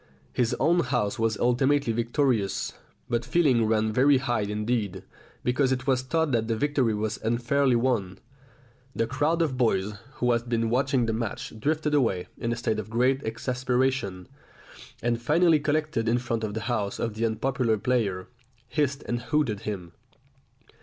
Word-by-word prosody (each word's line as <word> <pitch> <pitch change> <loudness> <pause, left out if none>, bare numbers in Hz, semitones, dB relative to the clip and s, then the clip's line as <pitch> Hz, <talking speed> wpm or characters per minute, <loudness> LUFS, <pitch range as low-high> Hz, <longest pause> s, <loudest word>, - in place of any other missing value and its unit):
His 120 -2 +1
own 170 +5 +3
house 120 -9 0
was 115 -2 +1
ultimately 130 +1 +2
victorious, 120 -3 0 0.3
but 120 -1 0
feeling 125 -4 +3
ran 110 0 +1
very 135 +4 +5
high 120 -4 0
indeed, 105 -2 -2 0.4
because 130 +2 +2
it 125 -1 -1
was 130 -2 +2
thought 160 +3 0
that 115 -2 +1
the 115 - 0
victory 130 -3 +1
was 110 0 -2
unfairly 120 +3 +2
won. 115 -7 0 0.8
The 115 - +1
crowd 145 +8 +1
of 140 -5 -2
boys 105 -4 +1 0.2
who 125 0 +1
had 120 0 -1
been 115 -1 0
watching 130 0 +2
the 110 - -1
match 110 -1 -4
drifted 150 +4 0
away 115 -11 +1
in 115 -1 -1
a - - 0
state 110 -2 -1
of 110 0 -6
great 125 +4 +2
exasperation, 125 -4 -1 0.8
and 120 0 0
finally 160 +5 +4
collected 150 -6 0
in 120 - +3
front 120 -2 -2
of 105 -1 -3
the 110 - -2
house 110 -3 -2
of 115 -2 -2
the 110 +2 -3
unpopular 115 0 0
player, 100 -6 0 0.4
hissed 140 -1 0
and 120 0 -1
hooted 120 -4 0
him. 90 -5 -6
120 Hz, 160 wpm, -26 LUFS, 110-135 Hz, 0.8 s, very